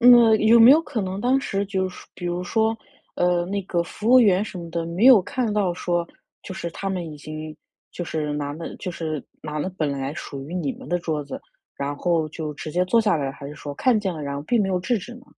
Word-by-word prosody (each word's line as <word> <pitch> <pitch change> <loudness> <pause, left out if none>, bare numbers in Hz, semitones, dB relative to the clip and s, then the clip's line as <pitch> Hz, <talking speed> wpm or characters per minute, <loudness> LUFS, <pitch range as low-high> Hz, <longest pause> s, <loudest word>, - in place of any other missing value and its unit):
嗯， 235 -2 +7
有 225 +2 +6
没 230 - +10
有 305 +4 +7
可 250 -8 -3
能 190 +1 -4
当 255 +4 +3
时 200 -6 -1
就 190 -2 -1
是 180 - -12
说 - - -13
比 175 - -6
如 175 +1 -2
说， 220 +4 +1 0.4
呃， 175 -1 +2
那 200 +2 -2
个 175 -2 0
服 210 +5 -5
务 255 - +8
员 200 -3 +4
什 200 - -8
么 170 -1 -7
的， 165 0 -2
没 180 +9 +2
有 255 -6 +9
看 235 +3 -2
到 195 -4 +1
说 175 -1 -1 0.4
就 190 - -7
是 170 - -4
他 195 +4 -4
们 180 -4 -3
已 - - -9
经 155 +1 -8 0.3
就 175 - -5
是 155 -2 -2
拿 145 -1 -3
了 165 +3 -7
就 185 - -5
是 155 -4 -4 0.2
拿 155 0 -4
了 150 - -1
本 155 -2 +1
来 135 +1 -3
属 140 -3 -7
于 175 - -6
你 150 -7 -1
们 - - -12
的 175 0 +1
桌 155 -4 -3
子， 140 - -7 0.4
然 140 +1 -2
后 165 -1 +1
就 155 -1 -5
直 155 - -6
接 180 +4 +1
坐 230 +6 +3
下 210 -6 +2
来， 140 -3 -2
还 140 0 -9
是 150 - -8
说 145 -1 -7
看 245 - +3
见 195 -4 -2
了， 155 - -6
然 140 -1 -3
而 140 - -5
并 230 +4 +2
没 195 - -1
有 185 - +1
制 210 +7 0
止 240 +6 -9
呢？ 245 +2 -14
175 Hz, 285 characters per minute, -23 LUFS, 155-210 Hz, 0.4 s, 没